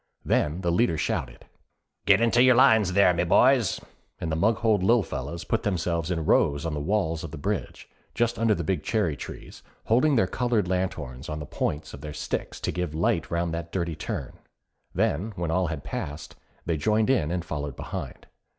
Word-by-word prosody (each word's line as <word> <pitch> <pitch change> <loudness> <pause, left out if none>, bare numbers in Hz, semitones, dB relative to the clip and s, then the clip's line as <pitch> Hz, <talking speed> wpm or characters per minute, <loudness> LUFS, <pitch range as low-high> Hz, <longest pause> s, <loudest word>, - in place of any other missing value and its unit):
Then 75 +5 +1
the 85 -2 0
leader 85 -2 +2
shouted: 60 -4 -3 0.6
'Get 100 +2 +6
into 115 +1 +4
your 130 -1 +6
lines 110 -6 +5
there, 95 -2 +5
my 85 0 +1
boys,' 125 +5 +4 0.4
and 80 - -3
the - - 0
Maughold 110 +3 +2
Lil 115 +4 +4
Fellas 80 +2 -5
put 115 - -1
themselves 85 -5 -1
in 80 -3 -1
rows 70 +1 +2
on 80 - -2
the 75 - -2
walls 80 -1 -1
of 80 - -5
the 80 - -8
bridge, 70 - -4 0.3
just 115 -1 0
under 115 -2 +3
the 85 - -3
big 85 -1 -1
cherry 90 -4 0
trees, - - -9 0.2
holding 135 +6 +3
their 115 - +4
coloured 115 0 0
lanthorns 90 -8 -3
on 75 - -3
the 75 - -6
points 75 +2 -3
of - - -9
their 75 -1 -6
sticks 75 - -4
to - - -1
give 90 -4 -3
light 85 0 0
round 85 -1 -1
that 85 0 -5
dirty 85 -3 -2
turn; - - -5 0.6
then 100 +9 0
when 85 -3 -2
all 90 +1 +1
had 80 -3 -5
passed, 75 +2 -6 0.3
they 85 -2 0
joined 105 - +2
in 80 - +1
and 90 0 -2
followed 75 -4 -4
behind. - - -7
85 Hz, 195 wpm, -26 LUFS, 80-105 Hz, 0.6 s, Get